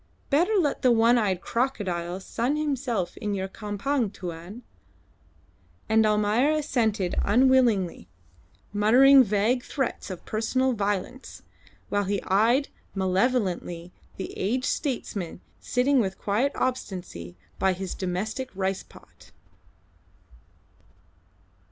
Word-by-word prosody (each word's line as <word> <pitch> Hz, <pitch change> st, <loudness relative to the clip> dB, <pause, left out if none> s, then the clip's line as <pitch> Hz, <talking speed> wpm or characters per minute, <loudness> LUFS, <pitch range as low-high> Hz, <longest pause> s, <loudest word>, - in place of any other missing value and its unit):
Better 350 Hz, +10 st, +3 dB
let 320 Hz, -8 st, +1 dB
the 255 Hz, -, +4 dB
one 235 Hz, +1 st, +4 dB
eyed 190 Hz, -5 st, 0 dB
crocodile 190 Hz, -9 st, -2 dB
sun 235 Hz, +8 st, -2 dB
himself 260 Hz, -, -2 dB
in 205 Hz, -2 st, -2 dB
your 190 Hz, -1 st, -2 dB
campong, 210 Hz, +4 st, -2 dB
Tuan." 180 Hz, +5 st, -8 dB, 1.2 s
And 220 Hz, 0 st, +4 dB
Almayer 210 Hz, +6 st, +2 dB
assented 230 Hz, -, 0 dB
unwillingly 235 Hz, -, +3 dB, 0.7 s
muttering 255 Hz, +6 st, +7 dB
vague 220 Hz, +4 st, +1 dB
threats 265 Hz, -7 st, -3 dB
of 185 Hz, -2 st, -8 dB
personal 255 Hz, +4 st, 0 dB
violence, 205 Hz, +4 st, -3 dB, 0.5 s
while 205 Hz, 0 st, 0 dB
he 200 Hz, +1 st, 0 dB
eyed 230 Hz, +9 st, +2 dB, 0.3 s
malevolently 185 Hz, -3 st, 0 dB, 0.2 s
the 190 Hz, -, -6 dB
aged 250 Hz, +7 st, -1 dB
statesman 210 Hz, -, -3 dB, 0.2 s
sitting 260 Hz, +2 st, +2 dB
with 190 Hz, -4 st, -1 dB
quiet 230 Hz, +8 st, 0 dB
obstinacy 180 Hz, -, -4 dB, 0.2 s
by 190 Hz, -1 st, +3 dB
his 185 Hz, 0 st, -5 dB
domestic 205 Hz, +8 st, -3 dB
rice 190 Hz, 0 st, -1 dB
pot. -, -, -18 dB
215 Hz, 105 wpm, -26 LUFS, 190-255 Hz, 1.2 s, muttering